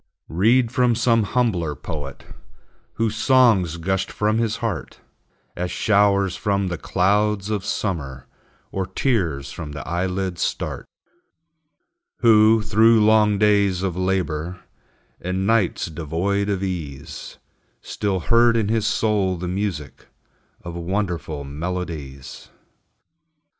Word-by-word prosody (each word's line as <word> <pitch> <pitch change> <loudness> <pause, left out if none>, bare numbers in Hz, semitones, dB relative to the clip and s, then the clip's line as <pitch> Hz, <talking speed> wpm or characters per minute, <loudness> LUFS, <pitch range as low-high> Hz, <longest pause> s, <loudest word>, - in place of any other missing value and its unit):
Read 115 +8 +3
from 125 -2 +2
some 115 0 +3
humbler 100 -9 0
poet, 75 -2 -7 0.7
Whose 115 -1 -1
songs 110 - +3
gushed 95 +3 -1
from 110 +1 0
his 115 -2 0
heart, - - -4 0.6
As 90 +1 -3
showers 100 -3 +2
from 100 -3 -1
the 90 - -3
clouds 100 +2 +1
of 105 -3 -1
summer, 70 -12 -3 0.5
Or 95 -1 -2
tears 85 - -1
from 75 -1 -7
the 70 - -7
eyelids 90 +1 -2
start; - - -3 1.3
Who, 110 -1 +5
through 110 +1 +4
long 105 -1 +4
days 100 -3 +2
of 95 -3 -1
labor, 90 -2 -2 0.6
And 95 +2 -2
nights 110 -3 +1
devoid 85 +6 -2
of 100 -1 -1
ease, 75 -6 -6 0.5
Still 100 -3 -2
heard 115 +4 +4
in 105 -3 0
his 110 -1 +1
soul 105 -5 +1
the 90 +1 -5
music 90 -5 -4 0.6
Of 85 - -7
wonderful 85 -4 -3
melodies. 75 -3 -6
95 Hz, 115 wpm, -22 LUFS, 85-105 Hz, 1.3 s, Who